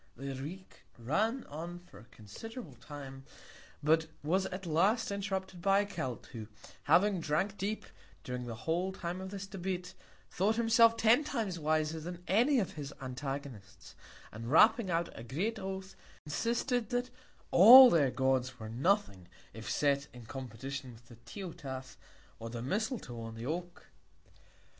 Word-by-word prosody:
The 135 +2 -5
Greek 160 +9 -9
ran 215 - 0
on 165 +4 -7
for 175 - -15
a 110 - -15
considerable 150 - -10
Time; 135 +1 -10 0.6
but 160 +2 +3 0.2
was 185 +5 +1
at 185 +1 -6
last 200 +8 +2
interrupted 190 -2 -3
by 195 +2 +4
a - - -2
Celt, 130 -11 -5
who 110 -4 -7 0.4
having 195 +1 +4
drank 165 +6 0
deep, 205 +3 -3 0.4
during 125 -1 -5
the 115 - -5
whole 175 +4 0
Time 180 -1 -5
of 190 - -6
this 195 0 -6
Debate, 185 -2 -4 0.4
thought 205 +5 +1
himself 230 0 +5
ten 230 +6 +5
Times 215 - -3
wiser 155 +1 0
than 175 +2 -7
any 245 +9 +4
of 205 -7 0
his 145 -2 -7
Antagonists; 130 -5 -7 0.4
and 115 +2 -7
wrapping 215 - +5
out 170 0 0
a - - -8
great 185 - -2
Oath, 190 0 -6 0.3
insisted, 235 - -1
that 245 +1 -1 0.4
all 245 +7 +11
their 145 -5 +4
Gods 130 -1 0
were 110 -1 -7
nothing, 125 - 0 0.3
if 110 +1 -7
set 140 0 +1
in 120 -2 -11
Competition 130 +1 -6
with 115 +1 -18
the 120 - -13
Teutath 130 - -8 0.4
or 115 - -6
the 115 0 -5
Misletoe 200 - -3
on 115 0 -7
the 115 +1 -7
Oak. 175 +4 -5
170 Hz, 150 wpm, -32 LUFS, 130-200 Hz, 0.6 s, all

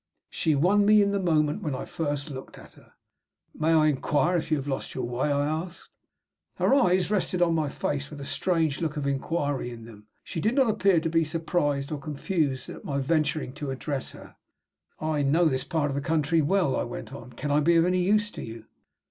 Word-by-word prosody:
She 155 -2 +1
won 190 +8 +4
me 210 0 +6
in 200 - +1
the 200 - 0
moment 155 -5 +1
when 150 -4 -2
I - - -5
first 145 -2 -3
looked 130 -1 -9
at - - -14
her. - - -21 0.6
"May 160 +1 0
I 160 -1 +5
inquire 150 +4 +1
if 165 - -3
you 155 - +2
have 135 - -4
lost 135 -2 -4
your 130 - -2
way?" 125 +4 -1
I 145 0 +1
asked. 160 +4 -4 0.7
Her - - +2
eyes 185 -8 +3
rested 190 -3 0
on 175 -1 +3
my 155 -3 0
face 140 0 -3
with 150 - -9
a 140 - -6
strange 160 -3 0
look 155 -2 -2
of 145 - -2
inquiry 140 -1 -1
in 115 -2 -9
them. 105 -2 -14 0.2
She 165 - -5
did 220 +8 +1
not 265 -5 +4
appear 195 -4 +3
to 165 - -2
be 165 0 +3
surprised 155 -3 -1
or 150 - -3
confused 145 -2 -2
at - - -9
my 140 - -2
venturing 150 -1 0
to 145 -1 -5
address 135 +1 -3
her. - - -13 0.6
"I 155 -1 -1
know 155 +5 +3
this 130 -4 +1
part 150 -1 0
of - - -3
the 140 - -1
country 160 +1 +1
well," 170 -1 +2
I - - 0
went 120 - -6
on. 125 -2 -10
"Can 145 +4 -4
I 145 - +4
be 170 +3 +3
of 165 0 +5
any 180 0 +2
use 210 +3 +2
to - - -8
you?" 115 -1 -8
155 Hz, 225 wpm, -27 LUFS, 140-170 Hz, 0.7 s, me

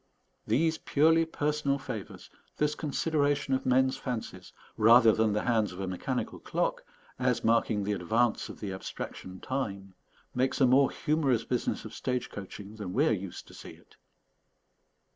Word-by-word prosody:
These 160 +8 +2
purely 160 +3 +3
personal 150 -3 0
favours, 125 -7 -7 0.3
this 150 0 +1
consideration 145 -2 0
of 130 - -1
men's 130 +1 +3
fancies, 110 -7 -5 0.2
rather 115 +1 +7
than 110 0 +2
the 105 - 0
hands 110 -5 +1
of 90 - -10
a 95 - -2
mechanical 95 +8 -3
clock, - - -1 0.4
as - - +1
marking 110 -2 +2
the 105 +1 -1
advance 110 +5 0
of - - -10
the 100 -2 -4
abstraction, 95 0 -7
time, 100 -8 -4 0.4
makes 130 +3 0
a 135 - +6
more 135 +2 +5
humorous 140 -7 0
business 125 -2 -2
of - - -8
stage 125 -1 -3
coaching 100 +1 -9
than 95 -4 -5
we 145 +8 +3
are - - +3
used 95 -4 -4
to - - -14
see - - -10
it. - - -21
125 Hz, 160 wpm, -29 LUFS, 105-140 Hz, 0.4 s, rather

